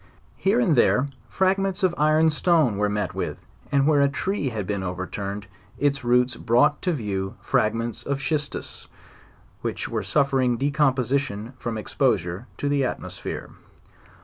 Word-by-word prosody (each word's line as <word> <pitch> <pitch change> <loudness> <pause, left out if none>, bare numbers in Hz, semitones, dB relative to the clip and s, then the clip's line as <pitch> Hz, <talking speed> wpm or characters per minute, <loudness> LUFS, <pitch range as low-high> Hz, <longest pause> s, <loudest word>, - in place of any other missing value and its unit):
Here 200 +5 +2
and 190 -11 +3
there 130 +2 +3 0.2
fragments 195 +1 +1
of 185 -2 +3
iron 155 +2 +4
stone 155 - +2
were 105 0 +1
met 105 -2 -2
with, - - -3 0.3
and 140 -1 +3
where 150 -2 +4
a 140 - +4
tree 145 +1 -1
had 110 -5 -4
been 100 0 -2
overturned, 100 +3 -4 0.3
its 140 -1 +1
roots 125 +1 +2
brought 125 +6 +3
to 180 - +1
view 100 -7 -3
fragments 115 +1 0
of 140 -1 -2
schistus, 145 0 -3 0.7
which - - -3
were 110 -2 -1
suf 140 +8 +1
fering 125 -3 +2
decomposition 135 -4 0
from 115 -2 -3
exposure 90 0 0
to 145 - -2
the 140 -1 +2
atmosphere. 125 - -4
130 Hz, 150 wpm, -24 LUFS, 105-150 Hz, 0.7 s, iron